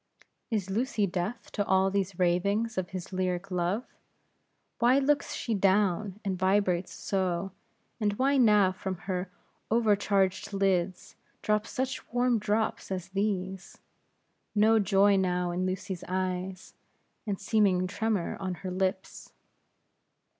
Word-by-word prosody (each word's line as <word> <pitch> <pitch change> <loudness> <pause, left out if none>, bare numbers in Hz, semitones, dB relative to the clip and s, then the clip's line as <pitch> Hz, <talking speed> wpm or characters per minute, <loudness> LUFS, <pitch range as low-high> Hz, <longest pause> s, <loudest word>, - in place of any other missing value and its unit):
Is 205 -5 -2
Lucy 225 0 0
deaf 190 +5 -4
to 205 - 0
all 190 0 +2
these 195 -2 -1
ravings 200 +6 +1
of 185 -1 -2
his 185 0 -7
lyric 185 +1 -2
love? 180 +6 0 0.9
Why 245 +2 +5
looks 280 +1 +1
she 230 - -2
down, 195 0 +1
and 190 -2 -2
vibrates 185 -2 +1
so; 190 -1 -2 0.5
and 210 -2 +1
why 270 +6 +2
now 210 -6 +5
from 185 0 -4
her 185 -1 -2 0.4
over 225 -2 +4
charged 200 0 0
lids, 190 -2 0 0.3
drops 210 0 +1
such 260 +1 -3
warm 245 -1 +2
drops 215 +1 -1
as 185 -2 -4
these? 190 -1 -3 0.8
No 220 +2 +5
joy 200 0 +4
now 180 -2 0
in 180 +1 -1
Lucy's 185 -1 -4
eyes, 185 0 -3 0.5
and 200 -2 -2
seeming 195 -3 +2
tremor 200 -1 -1
on 185 -2 -3
her 185 - -2
lips. 185 +1 -3
195 Hz, 130 wpm, -29 LUFS, 185-210 Hz, 0.9 s, Why